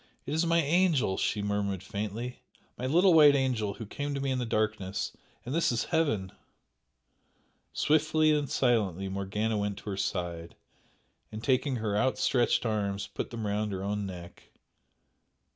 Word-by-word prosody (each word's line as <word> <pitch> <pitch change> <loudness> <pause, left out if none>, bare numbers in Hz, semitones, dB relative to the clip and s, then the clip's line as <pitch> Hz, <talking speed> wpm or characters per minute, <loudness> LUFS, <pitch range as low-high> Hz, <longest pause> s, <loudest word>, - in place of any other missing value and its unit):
"It 145 - -4
is 160 +2 +1
my 170 0 +3
angel!" 155 - +2
she 105 - 0
murmured 100 -2 -1
faintly 110 +5 -5 0.4
"My 130 - -3
little 175 +6 +5
white 150 -3 +8
angel 120 -7 0
who 115 - -7
came 145 +6 -4
to - - -2
me 135 0 -1
in 130 - 0
the 125 - -2
darkness! 110 -3 -1 0.3
And 125 - -4
this 165 -3 +2
is 115 - 0
Heaven!" 110 - +1 1.4
Swiftly 155 +1 +3
and 145 -3 +1
silently 100 -7 +1
Morgana 105 +3 -1
went 100 -1 -2
to 105 - -6
her 95 - -4
side, 85 -4 -3 0.8
and 110 +1 -7
taking 130 0 +1
her 110 -3 -2
outstretched 125 +2 +2
arms 100 -2 -1
put - - -5
them 115 -2 -5
round 105 +1 -1
her 95 0 -4
own 100 0 -2
neck. 90 -2 -10
110 Hz, 160 wpm, -29 LUFS, 100-140 Hz, 1.4 s, white